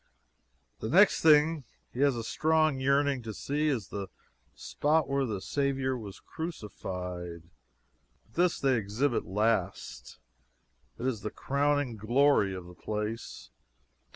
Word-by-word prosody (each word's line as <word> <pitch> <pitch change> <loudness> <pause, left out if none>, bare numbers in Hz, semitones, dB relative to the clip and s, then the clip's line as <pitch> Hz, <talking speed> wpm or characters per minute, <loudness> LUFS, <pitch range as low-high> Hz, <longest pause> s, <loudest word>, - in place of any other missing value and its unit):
The 110 - -4
next 195 - +5
thing 155 -1 +5 0.3
he 125 - -7
has 140 -2 +3
a 115 - -4
strong 155 +2 +2
yearning 140 0 +2
to 110 -2 -7
see 150 +2 -1
is 125 -10 -1
the 100 -1 -5 0.5
spot 155 +2 0
where 140 -1 0
the 105 -4 -3
Saviour 135 +2 -1
was 105 -5 -8
crucified. 90 - -6 0.8
But 110 - -29
this 175 0 +2
they 135 -2 +2
exhibit 115 +6 -1
last. 95 - -1 0.8
It 125 - -5
is 125 -5 -1
the 105 - -3
crowning 140 -3 0
glory 115 -2 +3
of 90 -1 -7
the 90 - -12
place. 105 - -5
130 Hz, 130 wpm, -29 LUFS, 105-145 Hz, 0.8 s, next